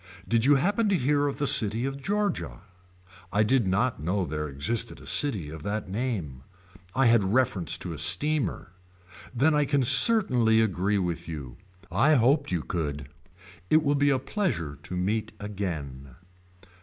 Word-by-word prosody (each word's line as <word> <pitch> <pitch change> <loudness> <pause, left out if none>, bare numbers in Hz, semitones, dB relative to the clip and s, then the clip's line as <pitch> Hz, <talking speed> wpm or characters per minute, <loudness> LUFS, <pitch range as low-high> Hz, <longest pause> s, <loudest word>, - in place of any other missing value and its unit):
Did 115 0 +1
you 145 +1 +5
happen 205 +9 +1
to 195 - +2
hear 145 +1 +1
of 140 - -4
the 145 - -1
city 115 -1 +3
of 135 0 -5
Georgia. 205 +5 -3 0.7
I 105 +2 +2
did 120 -1 +1
not 100 - 0
know 90 +4 -1
there 75 -1 -4
existed 115 +12 -3
a - - -14
city 100 - 0
of 80 -1 -9
that 100 +3 -4
name. 95 - -4 0.5
I 135 +1 +2
had 115 -3 +4
reference 115 - 0
to 90 - -6
a 75 - -6
steamer. 100 - +1 0.6
Then 140 +6 +2
I 150 -1 +2
can 140 -1 +1
certainly 125 - +5
agree 100 -1 0
with 85 -3 -3
you. 70 -7 -8 0.3
I 135 - +3
hoped 140 +2 +2
you 85 -4 -2
could. 75 -5 -4 0.6
It 155 0 +4
will 145 -1 +1
be 145 0 +2
a 135 - +2
pleasure 130 - -3
to 90 - -7
meet 105 +5 -2
again. 80 -11 -6
110 Hz, 165 wpm, -26 LUFS, 85-140 Hz, 0.7 s, you